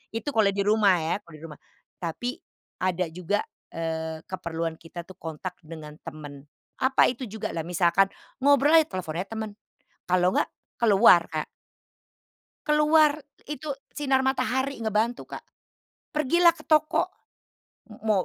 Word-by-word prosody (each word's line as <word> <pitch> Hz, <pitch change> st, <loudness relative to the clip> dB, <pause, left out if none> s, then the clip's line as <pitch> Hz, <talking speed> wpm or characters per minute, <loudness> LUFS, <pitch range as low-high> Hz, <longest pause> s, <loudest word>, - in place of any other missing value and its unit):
itu 225 Hz, +5 st, -4 dB
kalau 220 Hz, -2 st, +5 dB
di 200 Hz, -, -1 dB
rumah 210 Hz, -3 st, +4 dB
ya 160 Hz, +1 st, -1 dB
kalau 160 Hz, -2 st, -14 dB
di 150 Hz, -, -15 dB
rumah. 150 Hz, -3 st, -11 dB, 0.4 s
Tapi 245 Hz, -, -3 dB, 0.4 s
ada 185 Hz, -1 st, +1 dB
juga, 180 Hz, +5 st, -1 dB, 0.3 s
eee, 160 Hz, -1 st, -4 dB
keperluan 165 Hz, -3 st, -3 dB
kita 170 Hz, +1 st, -8 dB
tuh 190 Hz, -, -12 dB
kontak 165 Hz, +3 st, -6 dB
dengan 155 Hz, -1 st, -9 dB
teman, 145 Hz, -2 st, -9 dB, 0.4 s
apa 260 Hz, +1 st, +4 dB
itu 255 Hz, +1 st, -8 dB
juga? 220 Hz, +1 st, -4 dB
Lah 165 Hz, -, -2 dB
misalkan 180 Hz, +2 st, +3 dB, 0.4 s
ngobrol 285 Hz, +2 st, +5 dB
aja 310 Hz, -, +1 dB
telepon 160 Hz, -4 st, -4 dB
aja 190 Hz, -, -3 dB
temen, 220 Hz, -1 st, -4 dB, 0.6 s
kalau 180 Hz, 0 st, +3 dB
enggak, -, -, +2 dB, 0.3 s
keluar 200 Hz, -5 st, +7 dB
Kak. 155 Hz, -1 st, -2 dB, 1.2 s
Keluar, 300 Hz, 0 st, +4 dB, 0.2 s
itu 295 Hz, 0 st, -5 dB, 0.2 s
sinar 270 Hz, -3 st, +1 dB
matahari 265 Hz, 0 st, 0 dB
ngebantu, 220 Hz, +2 st, -1 dB
Kak. -, -, -9 dB, 0.7 s
Pergilah 340 Hz, +4 st, +4 dB
ke 335 Hz, -, -16 dB
toko, 310 Hz, 0 st, +3 dB, 0.8 s
mo 215 Hz, -3 st, 0 dB
205 Hz, 140 wpm, -26 LUFS, 165-265 Hz, 1.2 s, keluar